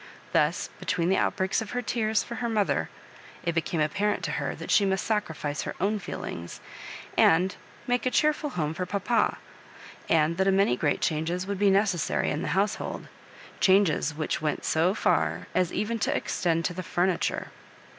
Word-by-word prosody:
Thus - - +1
between 170 0 0
the 190 - +3
outbreaks 190 +2 +1
of 220 - -6
hen 245 0 -1
tears 220 -3 0
for 235 - -7
her 235 - 0
mother, 215 -3 +1 0.5
it 170 - 0
became 165 0 -1
apparent 205 +7 0
to - - -2
her - - -2
that - - -6
she 205 - +5
must 190 -1 0
sacrifice 160 -9 -2
her - - -5
own 205 +3 +1
feelings, 85 - -6 0.6
and 180 +4 +4 0.3
make 245 +1 0
a - - +4
cheerful 300 +2 +1
home 155 - -2
for 180 +2 -4
papa, 205 +5 +1 0.7
and 165 +1 +3
that 190 +1 +2
a - - +5
great 190 -10 +2
many 145 - +2
changes 165 +4 -1
would 200 -1 -3
be 205 -1 +4
necessary 195 -3 +1
in 150 - -2
the - - -3
household 200 +2 -1 0.3
— - - -19
chang^ 185 -6 +3
which 155 0 -2
went 150 -1 -2
so 170 +5 +2
ffir 80 - +1
as 180 -1 +1
even 220 +3 -2
to - - 0
extend 165 -2 0
to 180 - -1
the 185 - -4
fur 175 0 0
niture. 185 -3 -1
185 Hz, 185 wpm, -27 LUFS, 160-205 Hz, 0.7 s, she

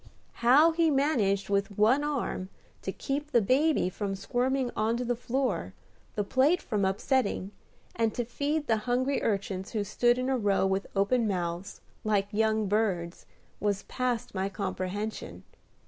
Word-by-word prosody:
How 280 +8 +6
he 330 0 +2
managed 250 -9 +1
with 200 0 0
one 240 +7 +4
arm 275 -10 -2 0.3
to - - -3
keep 290 +2 -3
the 245 -5 +4
baby 270 - +2
from 195 +1 -3
squirming 250 +5 0
on 225 +2 +1
to 250 - -2
the 245 0 0
floor, 255 +3 -2 0.4
the 205 - 0
plate 270 - +3
from 210 -4 -1
upsetting, 200 0 0 0.4
and 225 -1 +1
to 240 - -1
feed 290 +5 -1
the 225 -4 +2
hungry 260 +3 +1
urchins 195 -2 -2
who 215 -2 0
stood 240 +4 +2
in 255 0 -1
a 265 -1 +1
row 200 -3 +2
with 190 0 0
open 220 +4 +2
mouths, 175 -1 -3 0.2
like 205 -2 +1
young 220 0 +2
birds, 190 -5 -1 0.3
was 205 -2 0
past 250 -3 -2
my 190 0 -1
comprehension. 185 - -4
220 Hz, 155 wpm, -29 LUFS, 195-260 Hz, 0.4 s, How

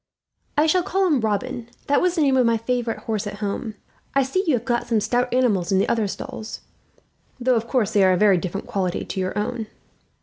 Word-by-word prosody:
"I 300 - +5
shall 360 +3 +3
call 385 +2 0
him 305 -7 +3
Robin. 225 +3 -2 0.2
That 285 - +2
was 360 -1 +2
the 330 - +1
name 270 -2 +3
of 255 - +4
my 230 -1 +3
favourite 235 0 -2
horse, 215 -2 -2
at 205 - -5
home. 210 +2 -4 0.4
"I 275 - +4
see 320 +9 0
you 305 - +4
have 240 0 -4
got 240 -1 0
some 230 -2 +2
stout 245 +3 0
animals 215 -8 +2
in 190 - +3
the 195 - +2
other 225 -3 +1
stalls, 215 +2 -7 0.8
though 255 +1 +2
of 230 -1 0
course 230 -5 0
they 205 -3 +4
are 185 - +5
of - - +2
a - - -4
very 200 -4 +5
different 185 +3 -4
quality 185 -3 -2
to - - -4
your 185 +1 -2
own." 220 +1 -2
230 Hz, 235 wpm, -23 LUFS, 205-255 Hz, 0.8 s, I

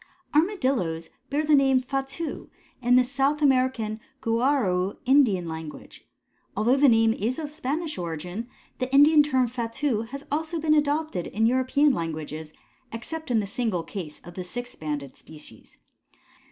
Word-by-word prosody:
All 300 - +7
Armadillos 255 - -1 0.2
bear 295 +2 0
the 305 - +3
name 270 -2 +5
Fatu 270 +5 -4 0.3
in 245 0 +4
the 250 - +6
South 275 +3 0
American 255 -6 +1 0.2
Guarau 230 -6 +1
Indian 245 -10 +4
language. 160 -1 -8 0.5
Although 235 +6 +3
the 280 0 +6
name 225 -1 +4
is 230 +5 -2
of 300 -2 -5
Spanish 305 - -3
origin 175 +6 -5 0.3
the 255 0 -2
Indian 295 +2 +7
term 260 -4 +2
Fatu 235 0 -2
has 275 +2 -7
also 320 +3 -1
been 305 0 +2
adopted 295 - 0
in 220 +2 0
European 260 +4 +3
languages, 155 - -5 0.4
except 315 +8 -6
in 230 -3 +2
the - - -3
single 200 -4 -2
case 165 -3 -7
of 175 - -12
the 185 - -5
six 245 +7 -6
banded 145 -3 -5
species. 150 -8 -14
250 Hz, 150 wpm, -26 LUFS, 185-285 Hz, 0.5 s, All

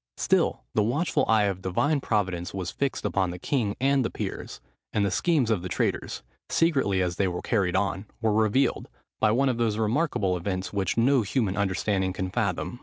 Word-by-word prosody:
Still - - +1
the 110 - +3
watchful 125 +11 +1
eye 110 -2 +4
of 100 -2 -1
Divine 140 - +1
providence 95 -6 -1
was 90 -2 -3
fixed 140 -1 -2
upon 95 -2 +1
the 90 - -5
king 110 -1 -1
and 135 +1 +3
the 115 - -1
peers; - - -6 0.3
and 105 -1 +1
the 100 - 0
schemes 140 - +2
of 105 -5 +1
the 90 - -5
traitors, 85 - -2 0.3
secretly 135 - +2
as 90 -1 -2
they 100 - +2
were 90 -1 -4
carried 95 -5 +1
on, 95 +1 -1
were 110 -2 +1
revealed, 110 +5 +1 0.3
by - - +4
one 130 +6 +2
of 125 -3 0
those 110 -3 +1
remarkable 110 - +1
events, 95 +2 -3
which 100 +1 -1
no 130 +3 +4
human 105 -2 0
understanding 95 -1 0
can 95 0 -3
fathom. 110 +2 -2
105 Hz, 190 wpm, -26 LUFS, 95-120 Hz, 0.3 s, eye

